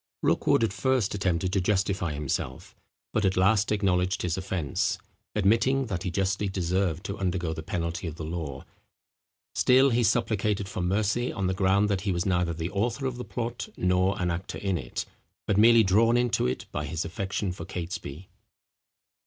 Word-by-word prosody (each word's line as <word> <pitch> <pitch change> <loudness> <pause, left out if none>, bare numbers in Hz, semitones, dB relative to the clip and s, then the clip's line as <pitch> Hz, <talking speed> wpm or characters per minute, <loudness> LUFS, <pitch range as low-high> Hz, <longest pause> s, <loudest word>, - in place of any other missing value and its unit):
Rookwood - - +3
at 110 - +1
first 120 +1 +1
attempted 95 -2 0
to 100 - +2
justify 95 -3 0
himself, 75 -1 -4 0.4
but 110 - +1
at 95 -1 +1
last 100 +3 +3
acknowledged 95 -1 +1
his 85 -2 0
offence, 90 -6 -1 0.4
admitting 115 +7 +3
that 95 -7 -3
he 95 - -2
justly 95 +2 0
deserved 90 -1 -1
to 100 - -5
undergo 90 -3 -1
the 80 - -5
penalty 85 +2 -3
of 80 - -5
the 80 - -6
law; 80 -5 -5 0.9
still 130 +2 +5
he 120 +1 +2
supplicated 105 -2 +1
for 95 -1 -4
mercy 105 +6 +1
on 95 - -2
the 95 - +1
ground 95 +2 +3
that 100 -3 0
he 100 0 -1
was 85 0 -1
neither 90 -3 +1
the 80 +2 -4
author 115 +7 -1
of 130 -2 -2
the 125 - -5
plot 120 -1 -4
nor 90 +2 +2
an 90 -1 0
actor 85 +3 -4
in 95 -2 -1
it, 85 - -4 0.4
but 100 - +1
merely 115 +2 +7
drawn 115 +5 +4
into 120 - +1
it 65 - -3
by 75 - -3
his 80 +3 -3
affection 95 +2 -2
for 85 -2 -7
Catesby. 90 -2 -6
95 Hz, 180 wpm, -27 LUFS, 90-105 Hz, 0.9 s, merely